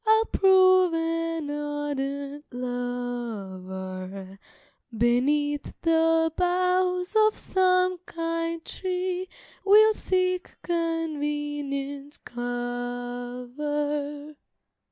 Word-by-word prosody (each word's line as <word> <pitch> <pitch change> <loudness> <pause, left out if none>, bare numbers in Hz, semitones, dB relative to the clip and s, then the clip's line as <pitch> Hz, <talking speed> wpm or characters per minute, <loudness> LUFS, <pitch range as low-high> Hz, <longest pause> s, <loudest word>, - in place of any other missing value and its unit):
I'll 440 0 +4
prove 370 -3 +5
an 330 -2 -1
ardent 290 -1 -3
lover, 195 -7 -5 0.6
Beneath 290 +5 +1
the 325 -1 +3
boughs 365 +1 +1
of 430 0 +4
some 365 -1 +2
kind 330 0 -3
tree 370 0 -3 0.3
We'll 430 +2 +7
seek 365 -2 -1
convenient 295 -4 -2
cover. 245 +5 -4
295 Hz, 65 wpm, -26 LUFS, 245-360 Hz, 0.6 s, We'll